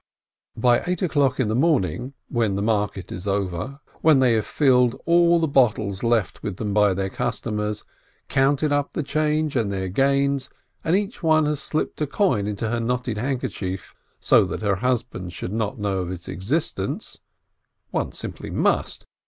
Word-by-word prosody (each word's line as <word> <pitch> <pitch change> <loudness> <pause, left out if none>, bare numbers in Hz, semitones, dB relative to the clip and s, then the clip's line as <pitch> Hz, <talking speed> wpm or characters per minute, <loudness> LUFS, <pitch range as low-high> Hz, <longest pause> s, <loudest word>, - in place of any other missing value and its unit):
By 120 +1 +4
eight 180 0 -1
o'clock 140 -6 +2
in 130 - +2
the 110 - 0
morning, 130 - +1
when 115 -5 0
the 100 - -1
market 105 -3 -1
is 90 +3 -6
over, 100 - -2 0.2
when 155 -3 +6
they 130 -3 +4
have 110 -1 0
filled 125 -4 +3
all 170 0 +5
the 160 - +1
bottles 110 -8 +2
left 115 -4 0
with 100 -3 -4
them 105 -2 -2
by 105 -2 +4
their 95 0 -2
customers, 105 -2 -2 0.4
counted 140 +3 +2
up 145 -1 0
the 155 - -2
change 155 0 0
and 110 -5 +1
their 95 -1 -2
gains, 140 +4 +1 0.3
and 165 - +2
each 205 +3 -2
one 155 -2 +4
has 150 -1 0
slipped 155 +1 -2
a 150 - +1
coin 135 - +1
into 105 +2 -2
her 120 +1 -1
knotted 120 -1 -2
handkerchief, 110 -7 -3 0.3
so - - +5
that - - -5
her 100 -3 +1
husband 115 -6 -2
should 90 - -5
not 110 -2 -2
know 100 -2 -1
of 90 -2 -3
its 90 -2 -7
existence 130 - -2 0.7
(one - - -1
simply - - -7
must! - - 0
120 Hz, 170 wpm, -23 LUFS, 100-145 Hz, 0.7 s, when